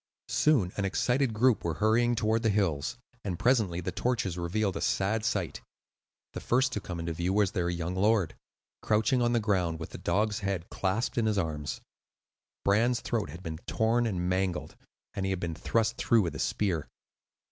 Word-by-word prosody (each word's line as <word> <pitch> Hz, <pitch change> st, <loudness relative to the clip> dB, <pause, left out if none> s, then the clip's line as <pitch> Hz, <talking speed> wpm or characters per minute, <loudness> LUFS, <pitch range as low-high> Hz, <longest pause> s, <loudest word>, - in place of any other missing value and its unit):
Soon 125 Hz, -13 st, +3 dB
an 100 Hz, -, 0 dB
excited 125 Hz, +6 st, +1 dB
group 115 Hz, +2 st, +3 dB
were 85 Hz, -2 st, -1 dB
hurrying 115 Hz, +6 st, +3 dB
toward 110 Hz, 0 st, +1 dB
the 115 Hz, -, +2 dB
hills, 95 Hz, -3 st, 0 dB, 0.3 s
and 95 Hz, -4 st, -3 dB
presently 105 Hz, -8 st, +2 dB
the -, -, -3 dB
torches 115 Hz, -8 st, -1 dB
revealed 95 Hz, +3 st, -1 dB
a -, -, -3 dB
sad 105 Hz, +3 st, +1 dB
sight. 100 Hz, -6 st, -1 dB, 0.7 s
The -, -, -4 dB
first 130 Hz, +4 st, +2 dB
to 105 Hz, -, -2 dB
come 90 Hz, -3 st, -6 dB
into 85 Hz, 0 st, -3 dB
view 85 Hz, +3 st, -1 dB
was 100 Hz, -2 st, +3 dB
their 90 Hz, -4 st, -1 dB
young 85 Hz, 0 st, -2 dB
lord, 100 Hz, -2 st, +2 dB, 0.5 s
crouching 110 Hz, +4 st, +2 dB
on 120 Hz, 0 st, +2 dB
the 120 Hz, -, +3 dB
ground, 90 Hz, -7 st, 0 dB
with 80 Hz, -, -7 dB
the -, -, -8 dB
dog's 105 Hz, +4 st, 0 dB
head 95 Hz, -4 st, -2 dB
clasped 105 Hz, +6 st, -1 dB
in 110 Hz, -, +1 dB
his 105 Hz, -1 st, +1 dB
arms; 75 Hz, -5 st, -2 dB, 0.8 s
Bran's 115 Hz, +5 st, +3 dB
throat 110 Hz, -9 st, -2 dB
had 85 Hz, +5 st, -9 dB
been 80 Hz, -1 st, -5 dB
torn 115 Hz, +2 st, +2 dB
and 90 Hz, -4 st, -1 dB
mangled, 95 Hz, 0 st, -1 dB, 0.4 s
and 100 Hz, -2 st, -3 dB
he 95 Hz, -, 0 dB
had 95 Hz, -2 st, -1 dB
been 85 Hz, -2 st, -3 dB
thrust 115 Hz, +7 st, 0 dB
through 115 Hz, -3 st, +3 dB
with 85 Hz, -4 st, -2 dB
a 65 Hz, -, -6 dB
spear. 90 Hz, -8 st, 0 dB
100 Hz, 190 wpm, -29 LUFS, 85-115 Hz, 0.8 s, Soon